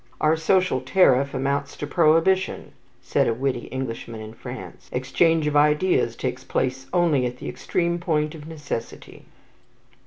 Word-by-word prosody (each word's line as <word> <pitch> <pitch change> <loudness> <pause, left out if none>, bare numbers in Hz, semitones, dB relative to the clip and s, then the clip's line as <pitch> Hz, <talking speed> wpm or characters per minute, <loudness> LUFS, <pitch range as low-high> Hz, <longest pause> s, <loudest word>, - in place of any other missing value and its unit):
"Our 155 +1 +3
social 165 -3 +2
tariff 135 -2 +3
amounts 140 +2 -2
to - - -4
prohibition," 165 +4 +2 0.3
said - - +1
a 115 - +1
witty 130 -1 -2
Englishman 115 -3 -5
in 110 0 -8
France. 125 +2 -9
"Exchange 155 +5 +2
of 150 0 -1
ideas 150 -4 +3
takes 130 +1 -4
place 130 0 -2
only 165 -8 +2
at 125 0 -7
the - - -8
extreme 170 -1 -1
point 155 -3 0
of 155 -2 -10
necessity." 150 -7 -7
145 Hz, 145 wpm, -24 LUFS, 130-165 Hz, 0.3 s, Our